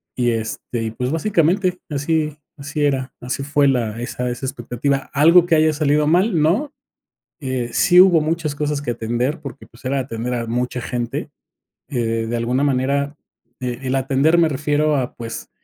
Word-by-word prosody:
y 120 -1 +1
este, 115 +1 -3
y, 110 - -3
pues, 125 +3 -3
básicamente, 180 +1 +1
así 150 +1 -1 0.2
así 140 +1 -3
era, 135 -2 -1
así 125 +2 -3
fue 145 0 +2
la 115 -4 0
esa 125 +1 -3
esa 120 +2 -4
expectativa. 130 +2 -2
¿Algo 165 +5 +6
que 170 - +3
haya 155 0 +3
salido 150 0 +2
mal?, 180 +3 +3
no. 205 - +1 0.7
Eh, 130 -4 -3
sí 180 - +5
hubo 180 -3 +7
muchas 155 -1 -1
cosas 150 -1 -2
que 140 - -2
atender, 120 +6 -2
porque, 140 -1 -9
pues, 115 - -20
era 135 +1 0
atender 125 -1 -3
a 120 -1 -2
mucha 125 +2 -2
gente, 120 0 -3 0.6
eh, 115 -3 -1
de 120 - -1
alguna 125 +4 0
manera, 140 +1 0 0.4
el 130 +1 -3
atender, 135 +5 +2
me 170 -1 +5
refiero 150 +1 +1
a, 130 -2 -2
pues, 115 -1 -7
140 Hz, 170 wpm, -20 LUFS, 125-155 Hz, 0.7 s, hubo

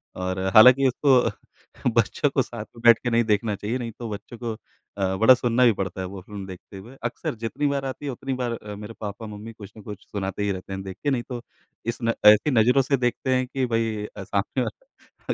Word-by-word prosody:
और 95 0 -3 0.2
हालाँकि 125 +5 +8
उसको 130 0 0
बच्चों - - +2
को - - +1
साथ - - -6
में 115 - -12
बैठके 120 +1 +5
नहीं 115 0 +3
देखना 105 0 +1
चाहिए, 105 +5 -3
नहीं 120 -2 -5
तो 115 -2 -5
बच्चों 105 +3 -8
को 115 0 -4 0.5
अ, 95 -1 0
बड़ा 115 +5 +7
सुनना 125 0 +2
भी 115 - +5
पड़ता 95 -1 -4
है 95 - -3
वो 95 0 -8
फ़िल्म 100 0 -8
देखते 95 +1 -11
हुए। 115 +8 -12
अक्सर 120 - -3
जितनी 115 +6 -2
बार 140 -1 -1
आती 135 +2 -5
है, 140 - -2
उतनी 135 +2 -4
बार 125 -2 -2
अ, 105 -2 -7
मेरे 105 +2 -8
पापा-मम्मी 105 +1 -7
कुछ 105 -2 -12
न 110 - -10
कुछ 105 -1 -9
सुनाते 100 0 -3
ही 100 - +1
रहते 95 +1 -6
हैं 95 - -5
देख 95 -1 -8
के 145 - +2
नहीं 120 -3 0
तो 120 -1 -5 0.4
इस 115 +1 -3
न 115 0 +2
ऐसी 105 +7 +7
नज़रों 125 +3 +4
से 135 +1 +1
देखते 125 +1 0
हैं 130 0 0
कि 130 0 -1
भई 115 -3 -1
अ, - - -5
सामने - - -1
वाला - - -8
115 Hz, 225 wpm, -24 LUFS, 105-125 Hz, 0.5 s, हालाँकि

